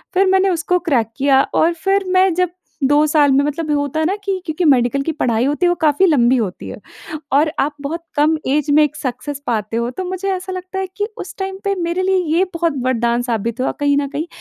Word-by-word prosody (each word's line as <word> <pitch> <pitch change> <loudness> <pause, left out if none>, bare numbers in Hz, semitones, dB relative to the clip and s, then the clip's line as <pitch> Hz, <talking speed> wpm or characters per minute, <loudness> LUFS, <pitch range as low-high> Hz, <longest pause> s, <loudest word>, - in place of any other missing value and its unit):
फिर 385 +1 +4
मैंने 380 +1 +3
उसको 360 +1 0
क्रैक 230 -5 +1
किया 270 -1 +4
और 335 +2 +3
फिर 390 0 +2
मैं 370 -1 +4
जब 365 -1 +1 0.4
2 290 +2 +4
साल 290 -2 +3
में 275 +1 +3
मतलब 300 +1 -3
होता 285 +2 -2
है 315 - +1
ना 390 - 0
कि 395 -1 -1
क्योंकि 325 +2 -2
मेडिकल 265 -1 +3
की 325 - -1
पढ़ाई 240 -4 0
होती 295 +5 0
है, - - +4
वो 350 - +1
काफ़ी 310 +4 +3
लंबी 260 -6 +3
होती 200 -6 -3
है, - - -7 0.6
और 300 +3 +3
आप 290 +2 0
बहुत 330 +4 -4
कम 310 +2 +3
ऐज 295 +1 0
में 300 +1 +5
एक 300 +1 -3
सक्सेस 270 +2 -5
पाते 225 -1 -2
हो। 235 +1 -1
तो 370 +8 -5
मुझे 375 +2 -3
ऐसा 375 0 -4
लगता 370 +1 -6
है 380 - -1
कि 410 - 0
उस - - -7
टाइम 385 0 -4
पे 400 0 +1
मेरे 340 +2 -1
लिए 380 0 +2 0.2
ये 375 - +4
बहुत 335 -3 0
वरदान 240 -1 +1
साबित 235 0 -3
हुआ - - 0
कहीं 285 0 +2
न 280 -1 -1
कहीं, 300 +4 -4
300 Hz, 235 wpm, -18 LUFS, 265-365 Hz, 0.6 s, में